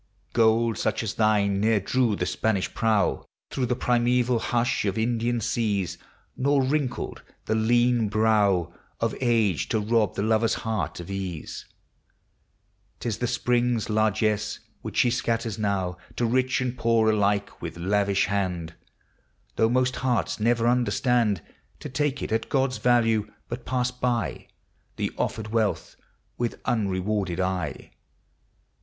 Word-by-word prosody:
Gold 115 0 +3
such - - 0
as 105 - -2
thine 105 -2 +2
ne'er 110 0 +3
drew 115 +2 +1
the - - -2
Spanish 110 -4 -1
prow 110 -4 +1 0.3
Through 130 -2 -1
the 125 - 0
primeval 125 0 +2
hush 120 +3 0
of 100 +1 -1
Indian 120 +1 0
seas; 100 -5 -1 0.4
Nor 140 +1 +2
wrinkled 135 -1 -2 0.2
the 110 - 0
lean 120 0 +3
brow 100 -5 +2 0.3
Of 115 -1 0
age 110 - +2
to 110 - +1
rob 110 -1 +1
the 100 - -1
lover's 110 +1 +2
heart 110 -4 -2
of 85 +2 -7
ease. 95 -5 -5 1.3
9 - - -46
T 120 - -2
is 105 - -2
the 120 - 0
spring's 120 -2 0
largess, 105 0 +1 0.2
which - - -6
she 120 - +4
scatters 115 -3 -1
now 95 -4 -1 0.2
To 120 - 0
rich 130 +2 +1
and 125 -1 -2
poor 115 -2 +3
alike, 100 -1 0
with - - -6
lavish 100 +2 +1
hand; 90 -5 -2 0.8
Though 110 - +3
most 130 +1 +1
hearts 125 -3 0
never 115 +1 +2
understand 120 -3 +2 0.4
To 150 - -7
take 145 +1 -1
it - - -4
at 115 0 -1
God's 135 -2 +1
value, 115 -4 +2 0.2
but 120 +1 -6
pass 125 0 0
by 125 -2 -2 0.5
The - - -2
offered 110 -1 -3
wealth 110 -2 -1 0.4
with 120 -1 -2
unrewarded 100 -3 -1
eye. 95 -1 -2
110 Hz, 140 wpm, -26 LUFS, 105-120 Hz, 1.3 s, she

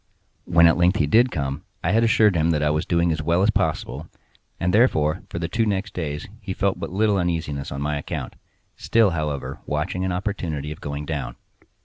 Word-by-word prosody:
When 85 -1 +5
at 85 - +5
length 90 +2 +3
he 75 - +2
did 115 - +4
come, 70 - -3 0.2
I 85 - +1
had 115 +2 +3
assured 110 -3 +4
him 80 0 +2
that 75 -2 +1
I 75 - +2
was 75 +1 -1
doing 85 -1 +2
as 80 -1 -1
well 85 +4 +2
as 110 - +4
possible; 75 -6 -2 0.5
and, 90 +1 0
therefore, 80 -10 +3
for - - -5
the 85 -1 -2
two 115 +7 0
next 100 -2 -1
days 75 -4 -4
he - - -5
felt - - 0
but - - -4
little 100 +1 +2
uneasiness 80 -5 -2
on 70 +1 -4
my 75 0 -1
account—still, 110 +7 -2
however, 75 -4 -3
watching 80 +5 -2
an 95 - -1
opportunity 90 -6 -3
of 75 - -9
going 70 +1 -5
down. 70 -6 -4
85 Hz, 205 wpm, -23 LUFS, 75-95 Hz, 0.5 s, When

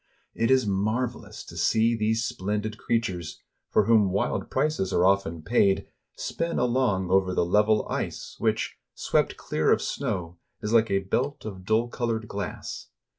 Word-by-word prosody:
It 115 - 0
is 130 -3 +4
marvelous 110 +5 -2
to - - -12
see 115 +1 +2
these 110 +1 +1
splendid 105 +2 -3
creatures, 95 -8 -2 0.3
for 105 - +3
whom 110 -3 +4
wild 95 +2 -1
prices 150 -11 0
are 90 - +3
often 95 -4 +1
paid, 100 -1 +2 0.3
spin 170 0 -3
along 120 -7 +1
over 95 -1 +3
the - - +2
level 105 +4 +3
ice, - - -4
which, - - 0 0.2
swept - - 0
clear - - 0
of - - +4
snow, 85 -1 -3 0.2
is 105 +2 -3
like 115 -1 +4
a 95 0 +2
belt 135 +9 -2
of 95 -4 -7
dull 110 +4 +2
colored 115 -2 -2
glass. 100 -3 -5
105 Hz, 155 wpm, -26 LUFS, 95-115 Hz, 0.3 s, is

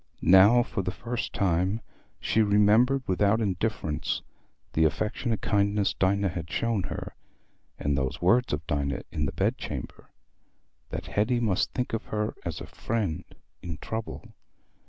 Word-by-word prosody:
Now, 105 +6 +8
for 95 - -3
the 90 - -2
first 115 +5 -4
time, 95 +1 +1 0.4
she 110 - +2
remembered 110 +6 +4
without 100 +4 +2
indifference 95 -6 -1 0.5
the 80 - +3
affectionate 110 - 0
kindness 100 -1 +1
Dinah 100 +1 +1
had 85 -2 -6
shown 115 -3 0
her, - - -5 0.6
and 70 0 0
those 65 +2 -2
words 120 +8 +3
of 75 +2 -2
Dinah 70 -3 -1
in 75 -1 -1
the - - -3
bed - - 0
chamber—that - - -10
Hetty 120 +4 +1
must 105 -6 +1
think 125 -2 -2
of 115 - -2
her 105 0 -2
as - - -4
a - - -7
friend 105 -9 -2 0.4
in 85 -3 -5
trouble. 110 +8 -6
100 Hz, 140 wpm, -27 LUFS, 85-115 Hz, 0.6 s, Now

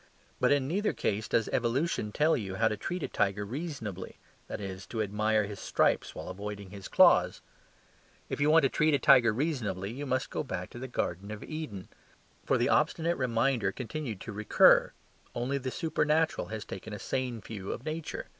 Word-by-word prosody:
But - - +3
in 140 -2 +2
neither 205 +7 0
case 105 +1 -1
does 115 - +1
evolution 120 -2 0
tell 155 +7 +3
you 95 -4 -4
how 110 +3 +3
to 105 - 0
treat 175 - -4
a - - -1
tiger 105 0 0
reasonably, 115 - -6 0.3
that - - -5
is, 95 -1 -6
to 115 - -5
admire 110 +1 +1
his 100 -1 -6
stripes - - +1
while - - -7
avoiding 100 +1 -6
his 100 -2 -8
claws. - - +5 0.9
If - - -4
you 145 - +4
want 160 0 +6
to 135 - +4
treat 155 +2 +3
a - - +4
tiger 125 -5 +6
reasonably, 110 - -2
you 140 +4 -6
must 130 0 -1
go - - -1
back 135 - -5
to 120 - -9
the 130 - -5
garden 100 -5 -3
of 105 -1 -6
Eden. 150 -12 -6 0.6
For - - +3
the - - +2
obstinate 170 +1 +2
reminder 120 -4 +1
continued 120 -2 -5
to 115 - -6
recur: 105 +1 +5 0.4
only 130 +4 -1
the 130 -1 -3
supernatural 155 +2 0
has 110 -1 -6
taken 100 +3 -7
a - - -4
sane 125 +1 -3
view 100 -3 -6
of 120 - -6
Nature. 155 0 -4
115 Hz, 190 wpm, -30 LUFS, 105-145 Hz, 0.9 s, want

